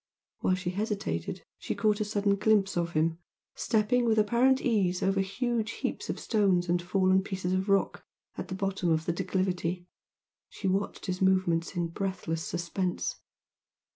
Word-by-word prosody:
While 185 - +2
she 185 -1 -3
hesitated 210 +2 -3 0.2
she - - -3
caught 215 -1 +1
a - - +1
sudden 205 -1 +1
glimpse 200 -1 +2
of 170 -1 -1
him, 160 +2 +1 0.3
stepping 235 +3 +1
with 225 -1 +2
apparent 240 +5 +4
ease 195 -8 +1
over 195 0 +2
huge 225 +2 -1
heaps - - -4
of - - -2
stones 195 -5 +2
and 175 +1 +1
fallen 185 +1 +3
pieces 185 -2 -3
of 190 +2 0
rock 195 0 +1 0.3
at - - -5
the 185 - -4
bottom 195 -2 -1
of 160 0 +1
the 170 - 0
declivity, 180 -1 -1 0.6
she 195 - -4
watched 195 +2 -1
his 185 -1 -3
movements 185 -2 +2
in 170 -1 -1
breathless 165 -3 -3
suspense. 175 +1 -2
190 Hz, 160 wpm, -29 LUFS, 175-210 Hz, 0.6 s, apparent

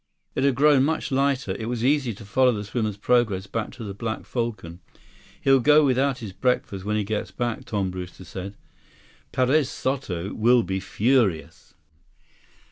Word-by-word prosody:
It 130 - -1
had 140 -2 +3
grown 140 -1 +5
much 160 +1 -1
lighter. 135 -5 +1
It 110 +4 -4
was 120 -1 -2
easy 140 -3 +2
to 105 - -12
follow 125 +5 +3
the 105 -3 -3
swimmer's 110 -1 -2
progress 105 -4 +1
back 110 +2 -3
to 120 - -9
the 100 -2 -5
Black 110 +2 -4
Falcon. 110 -8 -4 0.6
"He'll 135 0 +5
go 150 +4 +5
without 135 0 +2
his 110 -6 -8
breakfast 100 -2 -1
when 105 +1 -1
he 105 - 0
gets 105 +1 -3
back," 120 -2 -3
Tom 100 -3 -2
Brewster 90 0 -8
said. 95 +3 -7 0.8
"Perez 130 +2 +2
Soto 115 - -3
will 120 +2 +4
be 95 -1 -2
furious." 100 - 0
115 Hz, 165 wpm, -24 LUFS, 100-130 Hz, 0.8 s, grown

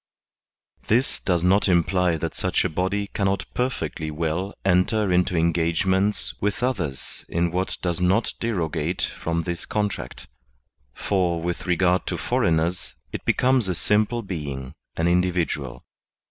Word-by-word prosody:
This 120 +5 +2
does 90 -3 0
not 95 +2 +4
imply 90 0 +3
that - - -3
such - - 0
a - - +1
body 95 +5 -1
cannot 100 -2 0
perfectly 80 - -2
well 80 +5 -2
enter 95 +2 +3
into 90 0 +2
engagements 85 +4 +1
with 105 +4 -1
others 90 - -2
in 85 0 0
what 90 +2 -1
does 90 -1 -1
not 95 +6 +2
derogate 90 -6 -1
from 85 0 -2
this 85 0 -4
contract; 105 -12 -3 0.7
for, 90 -4 0
with 85 +2 -3
regard 90 +1 +2
to - - -1
foreigners, 85 +2 0 0.2
it - - -5
becomes 125 -4 +3
a 90 - -1
simple 110 +6 +1
being, 70 -8 -5 0.2
an 85 - +2
individual. 85 -8 0
90 Hz, 130 wpm, -24 LUFS, 85-100 Hz, 0.7 s, not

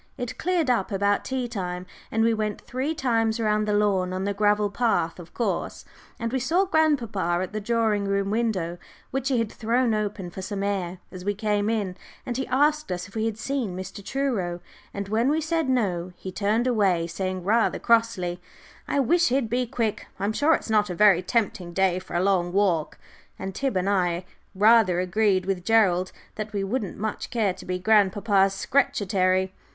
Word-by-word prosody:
It 245 -3 -5
cleared 350 -3 +1
up 220 -5 0
about 200 +1 +1
tea 260 -2 -2
time, 180 -5 -4 0.3
and 225 0 +2
we 230 0 +3
went 215 -1 -2
three 265 +6 -3
times 225 -4 +1
round 215 -1 +1
the 210 - +1
lawn, 195 -3 +1
on 185 +1 -2
the 200 +1 -1
gravel 205 0 +2
path, 200 -7 0
of 175 -1 -11
course, 235 - -2 0.3
and 230 +1 -3
we 265 - +1
saw 335 +10 +2
grandpapa 235 - +1
at 185 - -7
the 215 - -3
drawing 220 -2 +1
room 200 0 0
window, 195 -7 -1 0.3
which 270 0 -2
he 260 - +2
had 230 -2 -1
thrown 235 +1 +1
open 205 -4 -3
for 190 - -7
some 200 +1 -4
air, 190 -3 -2
as 185 -1 -8
we 205 +1 -1
came 210 0 0
in, 205 -5 -1 0.3
and 245 -1 -3
he 265 - -2
asked 295 +1 +2
us 180 +1 -3
if 200 - -18
we 220 0 -1
had 225 -2 -2
seen 235 -6 -2
Mr. 190 +2 -7
Truro. 205 -9 -2 0.3
And 200 -1 -5
when 225 +5 +1
we 305 +2 +2
said 320 -2 -1
no, 185 -8 0
he 190 - -7
turned 210 +5 0
away, 195 -9 +2
saying, 185 +2 -3
rather 220 +5 +2
crossly, 225 -7 +1 0.5
"I 285 - 0
wish 340 +6 +3
he'd 250 -3 0
be 250 0 0
quick; 225 -2 -2
I'm 200 +2 0
sure 305 +7 +4
it's - - -5
not 210 -2 +3
a 180 - -3
very 200 -2 +5
tempting 185 -3 -1
day 185 -1 +2
for 185 - -9
a 175 - +2
long 185 -3 +2
walk," 180 -5 +1 0.4
and 190 - -5
Tib 265 -2 -1
and 185 +1 0
I 180 -3 +1 0.3
rather 210 -3 +5
agreed 185 0 +1
with 190 -2 -2
Gerald 185 -4 +3 0.3
that 215 0 -5
we 200 - -1
shouldn't 200 0 -3
much 215 0 -4
care 215 -6 +1
to 180 0 -12
be 180 0 -1
grandpapa's 195 0 +3
"Scretchetary." 190 -7 +1
210 Hz, 195 wpm, -25 LUFS, 185-235 Hz, 0.5 s, very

